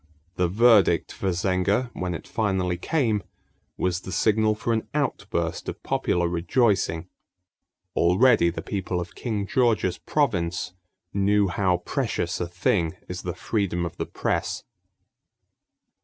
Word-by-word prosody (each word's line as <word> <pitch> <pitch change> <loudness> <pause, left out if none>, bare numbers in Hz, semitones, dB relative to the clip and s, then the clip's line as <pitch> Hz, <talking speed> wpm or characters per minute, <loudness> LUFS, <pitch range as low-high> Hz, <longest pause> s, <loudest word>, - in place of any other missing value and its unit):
The 90 0 +1
verdict 110 +1 +4
for 95 - -2
Zenger, 95 +6 +1
when 90 -1 -3
it - - -8
finally 95 -5 0
came, 110 - 0 0.6
was 90 -1 0
the 95 - -8
signal 110 +2 +2
for 110 +2 -1
an 110 - -1
outburst 95 - -1
of - - -8
popular 85 -1 +1
rejoicing. 90 -1 +1 0.9
Already 95 +2 +4
the 85 - -5
people 95 -2 -2
of 90 0 -6
King 105 -5 -3
George's 110 -6 +1
province 90 - 0 0.4
knew 100 0 +3
how 90 -1 +1
precious 110 - -1
a 90 - -1
thing 85 -1 0
is - - -5
the - - -4
freedom 95 -5 -1
of 85 - -6
the - - -3
press. - - -2
95 Hz, 130 wpm, -25 LUFS, 90-110 Hz, 0.9 s, verdict